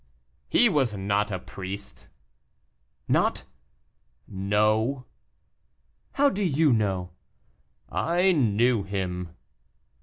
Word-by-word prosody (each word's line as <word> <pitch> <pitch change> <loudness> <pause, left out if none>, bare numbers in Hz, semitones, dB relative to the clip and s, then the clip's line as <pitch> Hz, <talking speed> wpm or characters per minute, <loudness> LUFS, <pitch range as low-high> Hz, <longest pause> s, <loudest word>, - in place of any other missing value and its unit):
"He 240 - +5
was 135 - +1
not 100 +2 0
a 95 - -1
priest." 95 +2 -8 1.0
"Not!" - - +1 0.8
"No." 105 +6 0 1.1
"How 285 +1 +3
do 205 -7 -1
you 155 -4 +3
know?" 95 -5 -1 0.8
"I 180 +3 +1
knew 120 - +2
him." 90 -3 -4
105 Hz, 85 wpm, -26 LUFS, 95-140 Hz, 1.1 s, He